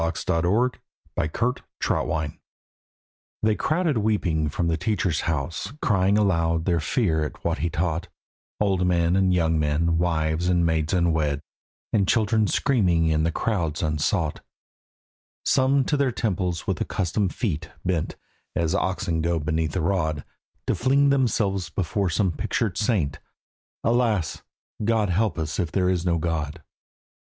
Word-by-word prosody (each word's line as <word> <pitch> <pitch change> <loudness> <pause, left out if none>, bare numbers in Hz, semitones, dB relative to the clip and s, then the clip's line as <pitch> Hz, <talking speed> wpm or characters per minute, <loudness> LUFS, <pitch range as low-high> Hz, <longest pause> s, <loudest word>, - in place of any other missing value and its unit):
AN 80 +1 0 0.2
IMPERFECT 110 +3 -1 0.3
REVOLUTION 80 -2 -1 1.0
They 110 0 +4
crowded 155 +1 0
weeping 90 -8 +1
from 85 +3 -1
the 85 - +1
teacher's 90 -3 0
house, 80 - -3
Crying 100 -3 +2
aloud 85 -5 +1
their 85 -3 +2
fear 80 - +1
at 75 - -6
what - - -1
he 85 - 0
taught, 85 0 -1 0.5
Old 95 -3 +2
men 85 0 +2
and 95 -1 +3
young 80 -3 +2
men, 80 +2 +1
wives 80 0 0
and 90 -1 +3
maids 80 -1 0
unwed, 80 -5 +1 0.5
And 100 -4 +3
children 110 0 +2
screaming 90 - +2
in 80 -1 +2
the 80 +1 +1
crowds 85 -7 -1
unsought: 75 +1 0 1.1
Some 135 +1 +3
to 150 - +1
their 140 -2 +2
temples 95 -7 -2
with - - -2
accustomed 95 +1 -1
feet 95 - -2 0.2
Bent—as 85 -1 -3
the - - +2
oxen 85 -3 -1
go 85 +1 +1
beneath 80 +1 -1
the - - 0
rod, 80 -4 0 0.4
To - - +1
fling 140 +3 +3
themselves 105 - +1
before 95 +3 -1
some 95 +2 +1
pictured 100 +4 -1
saint, 85 - 0 0.6
"Alas! 115 -8 +1 0.4
God 110 -3 +2
help 100 0 +1
us 80 -1 -3
if 85 -4 -1
there 90 -2 +1
is 90 -1 -1
no 85 -1 +2
God." 80 -1 -3
90 Hz, 140 wpm, -24 LUFS, 80-105 Hz, 1.1 s, They